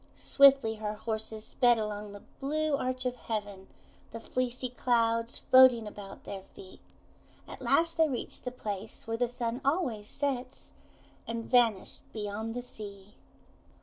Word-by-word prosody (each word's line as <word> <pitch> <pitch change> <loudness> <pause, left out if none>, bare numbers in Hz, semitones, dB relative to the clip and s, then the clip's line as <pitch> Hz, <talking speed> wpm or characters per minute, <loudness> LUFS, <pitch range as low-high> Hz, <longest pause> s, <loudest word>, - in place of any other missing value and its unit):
Swiftly 270 -5 +5
her 210 0 -3
horses 220 0 -4
sped 240 -1 +3
along 210 -1 -4
the 205 0 -11 0.2
blue 305 +2 0
arch 255 -1 -2
of 250 0 0
heaven, 205 -5 -5 0.4
the 230 - -6
fleecy 255 +1 -2
clouds 230 -2 +1
floating 255 -3 +6
about 205 -2 -9
their 195 -1 -6
feet. 190 - -12 0.7
At - - -10
last 330 0 +2
they 320 -1 +4
reached 255 - -4
the - - -2
place 215 -4 -6
where 225 0 -2
the 245 +1 +1
Sun 240 +1 -3
always 265 - 0
sets, 265 -3 -3 0.5
and 230 0 -3
vanished 230 -6 +2
beyond 215 +1 -4
the 245 - -3
sea. 205 -4 -9
230 Hz, 145 wpm, -30 LUFS, 210-255 Hz, 0.7 s, floating